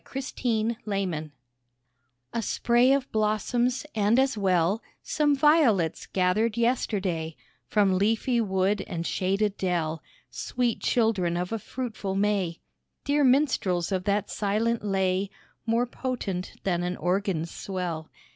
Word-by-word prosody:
A - - 0
SPRING 230 -4 -1
POSY 185 -7 -2 1.0
A 230 - 0
spray 240 +3 +3
of 275 -1 +1
blossoms, 230 +5 0
and 215 +2 +2
as 265 -1 +3
well 190 0 +2 0.2
Some 295 -2 +2
violets, 270 - +3
gathered 210 +5 +1
yesterday 190 -9 0 0.3
From 195 -3 +2
leafy 225 +4 +2
wood 190 0 +1
and 170 -1 -4
shaded 195 +3 0
dell, 165 -4 -1 0.3
Sweet 245 -2 -1
children 200 -8 +1
of 180 +2 -3
a 225 - -1
fruitful 215 -4 -4
May; 195 -4 0 0.4
Dear 290 +1 +2
minstrels 250 - +2
of 185 -1 -1
that 205 0 0
silent 220 +3 0
lay 190 -1 0 0.4
More 230 +2 +2
potent 230 -7 -4
than 175 -3 0
an 180 +1 -2
organ's 180 -2 -1
swell. 175 -5 -4
205 Hz, 125 wpm, -27 LUFS, 185-235 Hz, 1.0 s, spray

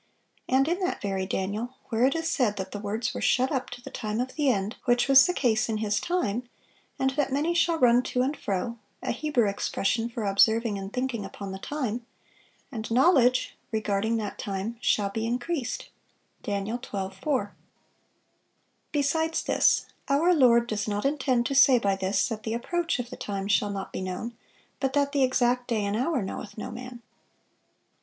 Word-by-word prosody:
and 265 +2 +3
in 350 +3 0
that 365 -1 -1
very 195 -2 -2
Daniel, 210 +7 -3
where 230 +1 +2
it 275 - 0
is 325 0 -1
said 245 -10 +1
that 190 0 -4
the 205 - -5
words 215 +3 -2
were - - -5
shut 255 +1 +2
up 260 -3 -1
to 245 0 -9
the - - -9
time 215 -1 -3
of 255 +1 -2
the 295 -3 +1
end 205 -2 0
(which 245 0 +3
was 275 +2 +8
the - - +2
case 240 -7 +1
in 220 - 0
his 210 -1 0
time), 250 - -1 0.5
and 265 -1 +1
that 275 0 -1
'many 300 +5 +1
shall 340 -1 +2
run 245 -4 +5
to 250 0 0
and 280 +4 -1
fro' 210 +3 -3 0.2
(a - - -1
Hebrew 250 -4 +1
expression 200 +3 -1
for 230 -1 -5
observing 210 +2 +3
and 195 0 -6
thinking 250 -3 -2
upon 195 -1 -7
the 190 - -6
time), 245 -3 -3 0.7
'and 220 -4 -5
knowledge' 255 0 +4 0.2
(regarding 220 +1 0
that 210 -2 -4
time) 200 +3 -3
'shall 200 -4 +1
be 225 +2 -2
increased.' 250 +3 -3 0.5
Dan. 200 -1 -2
12:4. 205 +1 -3 1.4
Besides 320 +2 0
this, - - +3 0.2
our 320 +6 +4
Lord 240 -6 +5
does 215 -3 -3
not 205 +2 -2
intend 265 -4 +1
to 275 - -1
say 270 -1 +7
by 200 -4 +1
this, 190 +1 0
that 220 -2 -4
the 220 +1 -3
approach 340 +8 -1
of 245 0 -5
the - - -7
time 195 -1 -4
shall 205 0 +2
not 195 -1 -5
be - - -3
known, 185 +6 -4 0.4
but 265 -1 -1
that 285 0 +2
the 285 -1 +1
exact 250 -1 +2
'day 220 -4 0
and 200 +1 -1
hour 260 +1 0
knoweth 195 +2 -6
no 215 - -5
man. 250 -1 -9
240 Hz, 185 wpm, -27 LUFS, 210-265 Hz, 1.4 s, was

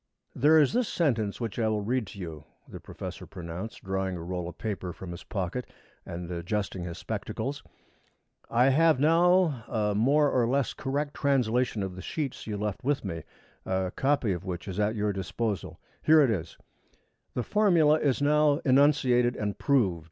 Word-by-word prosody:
"There 155 +4 +5
is 145 +3 +3
this 245 -1 +1
sentence 115 - 0
which 115 -2 -4
I 110 - +2
will 105 -1 0
read 120 0 -1
to 100 - -10
you," 80 -5 -7 0.2
the - - -9
professor - - -8
pronounced, 90 +4 -7
drawing 95 -1 -2
a 85 - -7
roll 90 0 -4
of - - -12
paper 95 -5 -4
from 90 +1 -8
his 85 - -8
pocket 100 +5 -4 0.4
and 85 +1 -6
adjusting 90 +1 -3
his 85 -1 -6
spectacles. - - -4 0.9
"I 125 +3 +4
have 155 +1 +4
now 165 -3 +4
a 105 -3 0
more 140 +7 +3
or 120 -2 +2
less 135 +1 0
correct 145 +2 -2
translation 125 -5 +1
of 95 -2 -5
the 95 - -7
sheets 145 - -4
you 105 -2 -3
left 105 -2 -3
with 140 -3 0
me, 85 -3 -4 0.4
a 95 -1 -1
copy 135 -7 +1
of 90 - -5
which 90 -1 -5
is 95 +1 -4
at 105 +2 +1
your 105 -1 0
disposal. 100 +2 -3 0.2
Here 155 0 +6
it 135 -5 +4
is: 85 -6 -4 0.8
'_The 125 - -1
formula 170 -8 +4
is 140 -2 +1
now 150 0 +4
enunciated 130 -3 +4
and 105 -1 -2
proved. 110 - +2
115 Hz, 175 wpm, -28 LUFS, 95-140 Hz, 0.9 s, Here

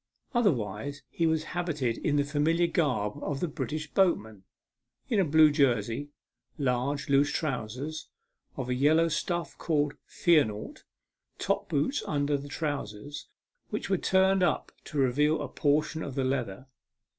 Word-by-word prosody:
Otherwise 140 - 0
he 165 - +1
was 160 -1 +1
habited 150 -10 -1
in 145 - 0
the 145 - +3
familiar 155 +4 +2
garb 140 -9 0
of 140 -2 -3
the 175 - 0
British 155 0 -4
boatman 110 - +1 0.7
in 220 - +2
a - - +5
blue 155 -1 +6
jersey, 130 -2 +1 0.5
large 140 +1 0
loose 140 +1 +3
trousers, 140 +2 -3 0.5
of 130 - -3
a 125 - 0
yellow 155 +6 +4
stuff 170 +2 -2
called 150 -3 +1
" - - -55 0.2
fear 165 -4 +7
naught;" 105 -1 -7 0.5
top - - -1
boots 150 - 0
under 145 0 +1
the 140 0 -4
trousers, 145 -3 -4 0.4
which 210 -1 -4
were 190 - +4
turned 190 0 +3
up 175 -4 +1
to 150 - -6
reveal 145 +4 +3
a - - -3
portion 150 +2 0
of 135 - -5
the 135 - 0
leather. 125 -4 -2
145 Hz, 150 wpm, -29 LUFS, 130-160 Hz, 0.7 s, fear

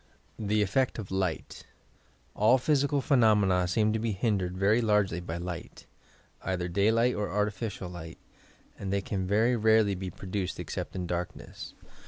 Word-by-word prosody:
THE 105 0 +1
EFFECT 130 +6 0
OP 105 -4 -6
WGHT 95 -3 -2 0.7
All 110 +5 +4
physical 140 +1 +1
phenomena 105 - +3
seem 105 +4 +2
to 110 - 0
be 110 -1 -1
hindered 95 -3 -1
very 105 +5 +3
largely 105 -5 +2
by 85 -1 -5
light, 85 -1 -7 0.3
— - - -30 0.2
either 90 -1 -2
daylight 110 +7 +2
or 105 - -2
artificial 105 -1 -2
light, 85 -2 -9 0.6
and 95 -1 -4
they 100 0 +1
can 95 -2 -3
very 110 +5 +3
rarely 110 -2 +4
be 95 0 -4
produced 95 +1 -4
except - - -5
in 90 -1 -3
darkness. 90 0 -5
100 Hz, 155 wpm, -29 LUFS, 90-110 Hz, 0.7 s, All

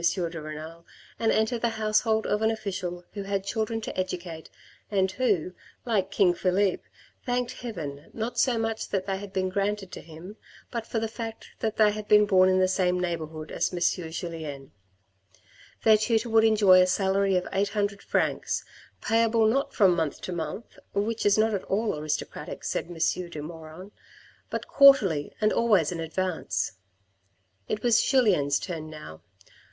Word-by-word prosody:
de 170 -1 -1
Renal 155 +2 -8 0.4
and 225 -1 +2
enter 220 +2 +1
the 235 - +1
household 220 +1 +1
of 210 +1 0
an 220 - +3
official 185 -5 -4
who 205 - -5
had 195 0 -2
children 220 +2 -2
to - - -6
educate 175 -3 -4 0.4
and 190 -2 +1
who, 195 -8 0 0.3
like 205 -6 0
King 190 -2 +3
Philippe, 185 +2 +1 0.4
thanked 245 0 -1
Heaven 155 - -6
not 225 +2 -3
so 250 -3 +3
much 225 0 -2
that 190 -1 -1
they 195 -1 -2
had 200 -1 -8
been 185 -1 -1
granted 200 0 -2
to - - -8
him, 170 +6 -11 0.3
but 230 -2 -4
for - - -3
the 225 0 0
fact 225 0 -7
that 220 -1 -2
they 215 -1 +5
had 210 0 -6
been 210 0 +6
born 185 -2 +5
in 185 - +3
the 185 0 +4
same 180 -1 +1
neighbourhood 160 -3 -4
as - - -1
M. 175 -1 0
Julien. 160 -5 -6 1.1
Their 220 -1 +6
tutor 225 +1 0
would 225 0 +5
enjoy 205 -4 +6
a 180 - +4
salary 195 +1 +1
of 180 - 0
800 200 0 -1
francs, - - -1 0.4
payable 225 0 +3
not 265 +6 +1
from 190 -5 +4
month 160 -3 -2
to - - -5
month, 170 +5 -6 0.2
which 215 +2 0
is 205 - +4
not 220 0 +3
at 195 - -2
all 210 0 0
aristocratic, 150 0 -4
said - - -2
M. 175 - -8
de 170 0 -1
Maugiron, 160 +4 -9 0.6
but - - -4
quarterly 205 - +5
and 215 0 +2
always 200 -10 +3
in 170 - -4
advance. 160 - -2 1.0
It 215 - -3
was 235 -2 +4
Julien's 190 - +3
turn 160 -4 -6
now. 115 - -10
195 Hz, 170 wpm, -27 LUFS, 170-220 Hz, 1.1 s, been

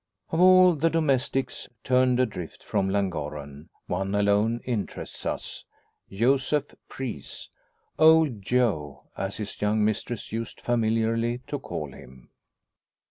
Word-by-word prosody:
Of 160 - 0
all 185 -1 +7
the 165 +2 +1
domestics 135 -4 0
turned 125 -1 +3
adrift 90 -10 -3
from 95 - 0
Llangorren 75 -7 -3 0.2
one 95 +2 -2
alone 105 +3 +2
interests 115 -5 -4
us - - -4 0.5
Joseph 135 +7 +1 0.2
Preece 130 -4 -6 0.5
"Old 160 -8 +5
Joe," 95 - 0
as 95 +1 -3
his 105 -2 -6
young 105 +1 +2
mistress 110 +2 -2
used 115 0 -5
familiarly 115 +1 0
to 145 - -4
call 75 - -5
him. 65 -3 -15
115 Hz, 115 wpm, -26 LUFS, 95-130 Hz, 0.5 s, all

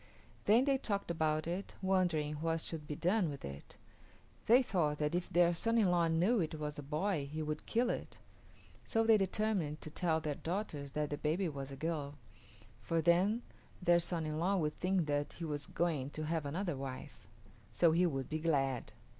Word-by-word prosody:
Then 230 +5 +5
they 275 -2 +2
talked 200 -7 -2
about 155 -2 0
it, 180 +4 -4
wondering 175 -6 +1
what 165 +1 -1
should 155 -3 -6
be 150 - -3
done 180 +1 +2
with 140 -1 -7
it. 70 +1 -9 0.7
They 245 +4 +7
thought 160 -10 0
that 150 +1 0
if 175 0 -1
their 175 0 +4
son 230 +7 +1
in 200 -5 +4
law 170 -1 +3
knew 180 +9 +3
it 160 -3 -1
was 150 -1 -4
a - - -3
boy 150 +1 -1
he 155 +1 -3
would 150 0 -4
kill 240 +2 +2
it; - - -5 0.7
so 225 - +1
they 225 0 +6
determined 195 -6 0
to 155 - -7
tell 160 -1 +1
their 155 -2 -2
daughters 155 -4 -4
that 150 -1 -1
the 145 - -3
baby 160 +5 0
was 140 -3 -5
a - - -6
girl, 150 -2 -3 0.7
for 165 - 0
then 185 +8 +3 0.4
their 175 -1 +4
son 170 -1 -2
in 155 0 -2
law 190 +4 +2
would 155 -3 -1
think 185 -2 +1
that 145 0 -1
he 170 - -6
was 145 -2 -3
going 155 -6 -1
to 155 - -2
have 160 -2 -1
another 175 +2 -2
wife. 135 -1 -7 0.4
So 170 -2 +4
he 175 +3 +4
would 135 -5 -2
be 155 - -2
glad. 135 -6 0
165 Hz, 195 wpm, -35 LUFS, 150-185 Hz, 0.7 s, They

